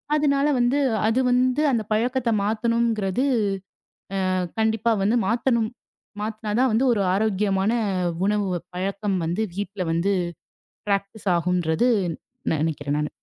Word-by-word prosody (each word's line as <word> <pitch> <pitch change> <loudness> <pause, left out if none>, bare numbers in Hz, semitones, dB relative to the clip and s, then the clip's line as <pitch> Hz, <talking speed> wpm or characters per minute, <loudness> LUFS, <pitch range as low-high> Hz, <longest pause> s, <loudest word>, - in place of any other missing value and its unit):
அதனால 285 -1 +2
வந்து 245 +3 +2 0.3
அது 225 +3 +2
வந்து 255 +3 +2
அந்தப் 220 -4 -1
பழக்கத்தை 240 +2 +1
மாத்தணுங்கிறது 225 0 0 1.1
அ - - +1 0.3
கண்டிப்பா 220 +1 +2
வந்து 220 +5 +2
மாத்தணும். 235 -1 +1 0.5
மாத்துனாதான் 220 +3 0
வந்து 230 +5 +2
ஒரு 205 - +1
ஆரோக்கியமான 200 0 +1 0.5
உணவு 205 -1 +1 0.3
பழக்கம் 195 +1 -2
வந்து 175 +7 -1
வீட்ல 200 -1 -4
வந்து 180 +5 +1 0.8
பிராக்டிஸ் 200 +1 -2
ஆகும்ன்னு 175 +5 +1 0.7
நினைக்குறேன் 150 -2 -1
நானு. 150 0 -1
215 Hz, 110 wpm, -24 LUFS, 195-235 Hz, 1.1 s, அதனால